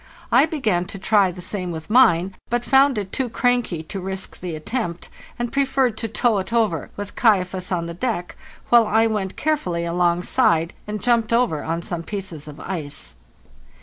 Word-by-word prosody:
I - - +6
began 215 - 0
to 195 - -7
try 195 0 +3
the 180 0 -8
same 185 -1 -3
with 160 -2 -6
mine, 190 -6 +4
but 240 0 -1
found 270 -1 +4
it 195 -2 -4
too 260 -2 -2
cranky 240 -9 0
to 190 +4 -6
risk 190 +1 -5
the 175 -3 -5
attempt, 170 +1 -4 0.3
and 240 -1 -3
preferred 270 -4 +2
to 225 - -2
tow 225 -1 +1
it 190 +2 -5
over, 220 -9 +1
with 205 -1 -6
'Kaifas' 185 -5 +1
on 170 -2 0
the 170 - -5
deck, 180 -2 -3 0.3
while 235 -2 +6
I 220 +2 +3
went 210 -4 -2
carefully 180 - -1
alongside 170 -1 +2
and 210 -2 -4
jumped 235 -2 +2
over 230 -11 +2
on 165 +1 -2
some 170 -1 -3
pieces 175 -5 -6
of 150 0 -10
ice. 150 -6 -4
195 Hz, 180 wpm, -22 LUFS, 175-235 Hz, 0.3 s, I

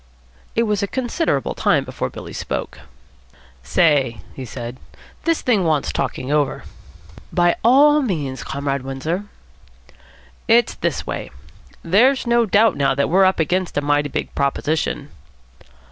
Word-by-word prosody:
It 230 - +3
was 210 -3 0
a 200 - 0
considerable 250 - -1
time - - +2
before - - -4
Billy - - -9
spoke. - - -4 0.8
"Say," 130 - +2
he 130 - -7
said, 120 +1 -7 0.5
"this 330 -1 +1
thing 220 -7 +2
wants 155 -4 +1
talking 130 - -3
over." 150 -2 0 0.7
"By 175 -1 +3
all 290 +5 +6
means, 150 - -3
Comrade 140 -1 -3
Windsor." 135 +9 -3 1.2
"It's - - +4
this - - -2
way. - - -5 0.5
There's 245 +11 +3
no 235 -1 +3
doubt 210 +1 +4
now 140 -1 +1
that 140 - 0
we're 190 +2 +5
up 190 -1 +2
against 180 +2 0
a - - +2
mighty 145 0 +1
big - - -4
proposition." 140 +1 -1
165 Hz, 135 wpm, -20 LUFS, 140-215 Hz, 1.2 s, all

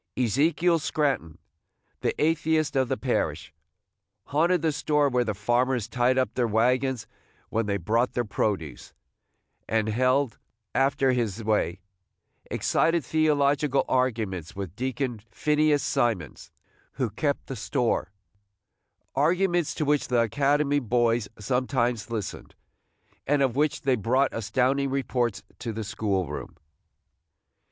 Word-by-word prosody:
Ezekiel 155 - +2
Scranton, 140 - -1 0.6
the - - -2
atheist 160 -1 +1
of 130 -1 +2
the - - 0
parish, - - -2 0.7
haunted 165 +3 +2
the 160 - +3
store 145 0 +1
where 125 -1 +2
the 110 -3 -3
farmers 120 +2 +1
tied 125 +3 +1
up 130 - +1
their 125 -2 +1
wagons 125 +3 +1 0.4
when 115 -1 -1
they 100 -1 0
brought 115 +7 0
their 120 - -1
produce, 95 - -3 0.7
and 110 -1 +1
held, 130 +3 +1 0.3
after 135 0 +2
his 115 -4 -1
way, 105 -4 0 0.7
excited 165 -3 +1
theological 145 -2 +2
arguments 110 -10 -1
with 95 -3 -6
Deacon 130 -1 -2
Phineas 150 -2 +2
Simons, 100 - -1 0.4
who 125 -5 -2
kept 140 +6 -1
the 135 - -6
store, 110 -5 -1 0.5
– - - -54 0.3
arguments 175 +3 +2
to 155 - -1
which 145 0 +1
the 120 -2 +2
academy 145 +4 +2
boys 120 -3 +1
sometimes 120 0 -1
listened, 110 -4 -5 0.7
and 145 -1 +3
of 130 -3 +1
which 150 +1 +1
they 135 -2 +2
brought 130 +5 +1
astounding 130 +5 +1
reports 125 -5 -1 0.2
to 115 - -4
the 110 0 -4
school 100 -3 -1
room. - - -7
125 Hz, 125 wpm, -26 LUFS, 110-145 Hz, 0.7 s, the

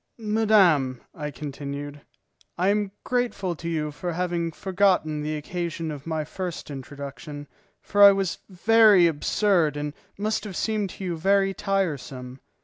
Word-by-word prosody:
"Madame," 205 - +3
I 150 -2 -5
continued, 145 +1 -6 0.6
"I 185 +3 +2
am 205 -1 +1
grateful 240 -8 -1
to 170 +2 -5
you 155 -2 -2
for 170 +4 -4
having 170 -1 -1
forgotten 185 -4 +1
the 155 +1 -2
occasion 165 +1 -4
of 145 0 -8
my 160 -1 -1
first 175 0 -6
introduction, 140 +1 -8 0.4
for 205 - +1
I 200 0 +11
was 195 -2 -1
very 210 0 +6
absurd 165 0 +2
and 145 0 -3 0.2
must 210 0 -1
have 205 -4 -7
seemed 215 -1 -1
to 195 - -9
you 175 -3 -2
very 195 +3 +2
tiresome. 140 -11 -3
170 Hz, 140 wpm, -25 LUFS, 150-195 Hz, 0.6 s, I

